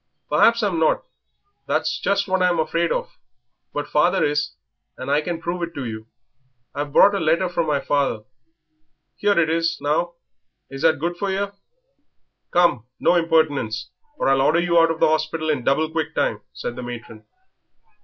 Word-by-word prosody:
"Perhaps 230 0 +4
I'm 190 -5 0
not 160 - +2 0.6
that's - - 0
just 200 0 0
what 190 -1 0
I'm 180 -1 +3
afraid 165 +1 0
of; - - -3 0.5
but 145 - -4
father 175 +5 +2
is, 150 0 -1 0.4
and 130 +2 -4
I 145 +1 +3
can 170 +1 -4
prove 170 +1 -4
it 170 0 -4
to 140 - -4
you. 110 -1 -7 0.7
I've 145 0 -4
brought 200 +7 +6
a 200 - 0
letter 165 +3 +2
from 170 -2 -1 0.2
father 140 -7 0 1.0
'ere 205 -3 +4
it 165 - +3
is; 165 0 0
now, 170 +4 -1 0.6
is 135 0 -7
that 160 -1 +4
good 165 +4 -1
enough 175 - -14
for 200 - -1
yer?" 200 +1 -2 1.0
"Come, 170 -10 +2
no - - +3
impertinence, 150 -9 +1 0.3
or - - -1
I'll 135 0 +3
order 155 +5 +3
you 170 -1 +3
out 165 0 +5
of 165 0 -2
the - - +5
hospital 155 0 0
in 135 -5 -2
double 145 +5 +2
quick 160 -1 -3
time," 105 - 0
said 120 - -6
the - - -6
matron. 120 -3 -8
160 Hz, 175 wpm, -22 LUFS, 145-175 Hz, 1.0 s, brought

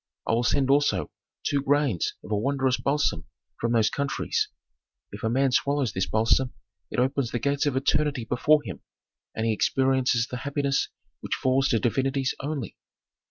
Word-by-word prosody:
I - - +1
will 115 +1 +2
send 135 +2 +2
also 145 +1 +2 0.3
two 140 -1 +1
grains 140 - +1
of - - -10
a - - +2
wondrous 130 +3 +1
balsam 140 - 0 0.3
from 115 0 0
those 110 -2 +3
countries; 140 -3 -1 0.6
if 100 - -8
a 110 - 0
man 135 +3 +2
swallows 140 -3 +1
this 95 0 -1
balsam, 115 +4 +2 0.3
it - - -6
opens 130 0 +1
the 120 - -2
gates 140 +3 0
of 140 - 0
eternity 145 -2 +1
before 150 +6 +3
him, - - -7 0.5
and 110 - -1
he 115 - +2
experiences 130 0 +2
the 125 - -6
happiness 140 +1 -1 0.3
which - - -3
falls 130 +1 +2
to 115 - +3
divinities 135 +3 0
only." 140 -6 -4
135 Hz, 165 wpm, -26 LUFS, 120-140 Hz, 0.6 s, those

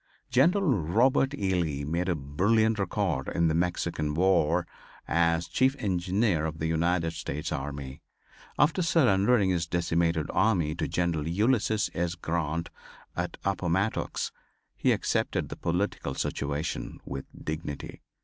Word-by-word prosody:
General 170 - +4 0.2
Robert 125 - +2
E. 95 -8 0
Lee 75 -6 -1
made 85 +5 -1
a 90 - +2
brilliant 105 +10 +1
record 90 -7 -1
in 85 -1 +2
the - - +1
Mexican 85 -3 -1
war 90 -1 +3 0.4
as 85 0 +2
Chief 130 +1 +2
Engineer 95 - +1
of 80 0 -6
the 80 - -3
United 80 +1 +1
States 75 -2 -4
army. 70 -1 -5 0.6
After 155 +5 +3
surrendering 120 - +3
his 85 -2 0
decimated 85 -2 +1
army 90 -6 +2
to 80 -2 -2
General 80 -1 -1
Ulysses 110 +3 +1
S. 85 0 -1
Grant, 85 0 -2 0.4
at - - -3
Appomattox, 95 +1 -1 0.4
he - - +2
accepted - - 0
the - - -5
political 90 +5 -2
situation 70 +3 -3
with 70 -1 -5
dignity. 75 -2 -5
85 Hz, 130 wpm, -28 LUFS, 80-100 Hz, 0.6 s, General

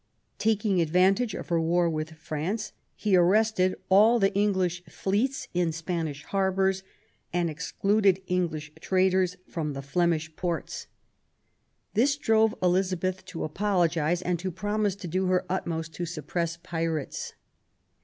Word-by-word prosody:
Taking 210 -4 +2
advantage 190 +7 +3
of - - -7
her 170 -1 +2
war 170 +1 +2
with 160 -1 -3
France, 165 +7 -3 0.2
he 205 -3 +2
arrested 185 +1 +3
all 215 +5 +6
the 195 -2 +2
English 190 -3 +1
fleets 205 +10 -1
in 175 -2 +1
Spanish 160 -3 -3
harbours 190 -1 +1 0.5
and 175 -1 0
excluded 195 +4 +1
English 165 -5 -2
traders 185 -1 +2
from 155 -3 -3
the 135 0 -6
Flemish 160 +1 0
ports. 175 -2 -3 1.1
This 275 +7 +3
drove 220 -4 +3
Elizabeth 185 0 +1
to 165 - -5
apologise 175 -2 +1
and 175 -1 0
to 185 +2 -3
promise 205 +2 -1
to 195 -3 -8
do 185 +3 0
her 185 0 +2
utmost 165 -3 -3
to 175 +2 -4
suppress 170 +1 -3
pirates. 165 -3 -3
180 Hz, 130 wpm, -27 LUFS, 165-195 Hz, 1.1 s, all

